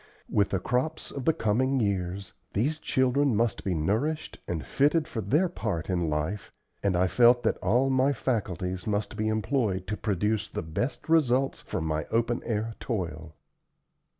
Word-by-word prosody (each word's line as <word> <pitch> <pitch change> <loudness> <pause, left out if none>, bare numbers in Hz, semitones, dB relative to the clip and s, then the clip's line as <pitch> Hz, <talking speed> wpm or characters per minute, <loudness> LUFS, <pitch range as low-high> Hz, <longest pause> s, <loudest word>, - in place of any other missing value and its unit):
With 100 -2 +3
the 95 - 0
crops 130 - -1
of 135 -3 -5
the - - +5
coming 130 +1 +1
years 95 -3 -2 0.2
these 145 +10 0
children 130 -2 +2
must 115 -1 0
be 95 -3 0
nourished 110 - -1
and 80 -3 -3
fitted 150 +3 +2
for 115 -8 -4
their 155 - +2
part 100 - -3
in 85 -3 0
life, 75 +7 -2 0.3
and 100 -3 +1
I 90 - +4
felt 120 +5 +5
that - - +1
all 125 +8 +2
my 130 +2 +3
faculties 95 - -2
must 105 0 -1
be 110 0 -1
employed 110 -4 0
to 105 +2 -3
produce 105 0 0
the - - -4
best 80 - -3
results 135 -5 +2
from 80 - -4
my 80 0 -1
open 115 +1 0
air 110 0 -1
toil. 85 - -4
110 Hz, 165 wpm, -28 LUFS, 95-130 Hz, 0.3 s, the